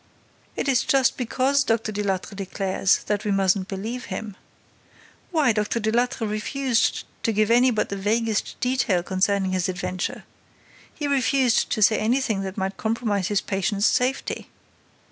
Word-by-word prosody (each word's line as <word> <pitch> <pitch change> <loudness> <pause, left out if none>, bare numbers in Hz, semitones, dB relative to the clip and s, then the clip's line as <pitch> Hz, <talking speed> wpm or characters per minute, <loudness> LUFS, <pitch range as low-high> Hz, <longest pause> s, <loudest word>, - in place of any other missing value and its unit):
"It - - -2
is 265 -3 +3
just 270 -2 +3
because 265 +3 +1
Dr. 225 -3 0
Delattre 200 -1 -2
declares 195 0 0
that 210 0 -2
we 210 - -2
mustn't 195 -1 +2
believe 225 +6 -5
him. 210 -3 -6 0.9
Why, 310 -8 +3
Dr. 210 +1 -1
Delattre 230 +2 0
refused 230 +3 0 0.2
to 225 - +1
give 215 0 +1
any 245 +2 +5
but 220 -4 0
the 200 - -4
vaguest 220 +2 -1
details 250 -8 +1
concerning 190 0 +1
his 185 -1 0
adventure! 180 0 -3 0.7
He 295 - -5
refused 265 -3 +2
to 215 - +1
say 215 +2 +4
anything 225 -3 +1
that 190 +1 -5
might 195 0 -2
compromise 220 -5 -1
his 205 -2 +1
patient's 195 +1 -1
safety! 255 +2 0
215 Hz, 145 wpm, -24 LUFS, 195-250 Hz, 0.9 s, any